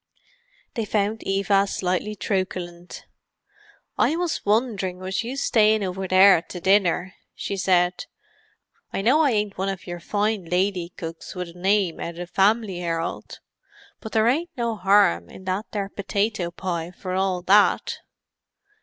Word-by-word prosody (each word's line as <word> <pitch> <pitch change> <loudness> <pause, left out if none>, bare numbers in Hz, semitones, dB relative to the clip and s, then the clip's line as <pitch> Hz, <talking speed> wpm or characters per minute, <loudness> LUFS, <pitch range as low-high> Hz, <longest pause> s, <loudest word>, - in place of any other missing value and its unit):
They 230 - -2
found 210 +1 -1
Eva 195 0 +2
slightly 185 +3 -2
truculent. 180 -3 -4 0.9
"I 310 - +3
was 345 -1 -2
wonderin' 205 -4 0
was 185 +2 -3
you 250 +4 -5
stayin' 220 -5 +3
over 190 0 -3
there 185 -1 +6
to 180 - -9
dinner," 185 -1 +2 0.2
she 200 - -4
said. 180 -2 +1 0.9
"I 195 - -3
know 270 +8 +4
I 295 - +4
ain't 210 -4 -1
one 195 +1 0
of 195 -2 -5
your 175 -1 -6
fine 205 +1 -1
lady 180 0 0
cooks 165 +2 -7
with 180 -1 -4
a - - -13
nime 190 0 +1
out 170 0 -5
of 175 0 -6
the - - -39
'Family 200 -2 +2
'Erald,' 165 -1 -4 0.6
but 220 - -9
there 220 0 +3
ain't 320 +8 +1
no 230 -3 -2
'arm 180 - +3
in 190 - -12
that 190 +4 -2
there 200 -2 -3
potato 200 -2 -1
pie, 170 -1 -4
for 185 +1 -6
all 185 -1 0
that!" 200 +3 +3
195 Hz, 155 wpm, -24 LUFS, 180-210 Hz, 0.9 s, there